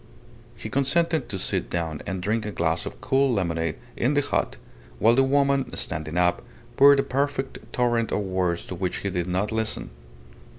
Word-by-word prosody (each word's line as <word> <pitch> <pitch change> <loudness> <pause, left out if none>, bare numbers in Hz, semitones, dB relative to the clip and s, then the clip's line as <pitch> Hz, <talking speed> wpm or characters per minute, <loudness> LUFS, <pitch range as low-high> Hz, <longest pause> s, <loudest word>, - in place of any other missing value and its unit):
He 115 - -7
consented 145 +7 +1
to 95 - -3
sit - - -2
down 80 -3 -2
and 95 -2 -3
drink 110 +3 0
a 105 - -4
glass 85 -2 -1
of - - -8
cool 135 0 +2
lemonade 85 -6 -1 0.2
in 130 +5 +1
the 145 - +4
hut, - - -1 0.4
while 115 +2 +5
the 135 - +4
woman, 140 0 +2
standing 75 +2 -2
up, 90 0 +2 0.3
poured 140 0 +7
a - - +3
perfect 135 0 -2
torrent 120 -2 +1
of - - 0
words 95 -3 -1
to - - -6
which 90 0 -3
he 100 - 0
did 90 -1 -2
not 95 +4 -1
listen. 110 - -2
105 Hz, 180 wpm, -25 LUFS, 90-135 Hz, 0.4 s, poured